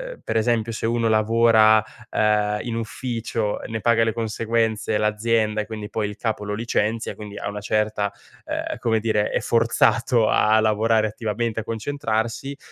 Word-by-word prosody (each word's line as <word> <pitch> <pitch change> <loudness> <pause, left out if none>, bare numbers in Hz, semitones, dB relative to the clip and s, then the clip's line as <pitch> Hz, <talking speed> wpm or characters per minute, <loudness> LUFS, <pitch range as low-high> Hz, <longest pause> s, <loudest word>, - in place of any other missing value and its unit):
uhm, - - -24
per 115 - -1
esempio: 115 0 +1
se 110 - -4
uno 115 -1 +1
lavora, 110 0 +5 0.3
uhm, 105 0 +1
in 120 -2 -4
ufficio, 115 -1 -3
ne 110 -1 -4
paga 115 -1 +3
le 110 - 0
conseguenze 115 -1 -1
l'azienda, 110 0 +1
e, - - -5
quindi, 110 -2 -7
poi 105 -2 -2
il 105 - -8
capo 110 -2 -2
lo 105 - -3
licenzia, 115 0 -1
e, - - -10
quindi, 105 -1 -9
a 100 - -4
una 105 0 -5
certa, 105 -1 0 0.3
uhm, - - -3
come 110 -1 +1
dire, 105 -2 +1
è - - 0
forzato 115 0 +2
a 110 +1 +4
lavorare 110 0 +2
attivamente, 110 +1 -3
a - - -9
concentrarsi, 115 +2 -3
110 Hz, 170 wpm, -23 LUFS, 105-115 Hz, 0.3 s, lavora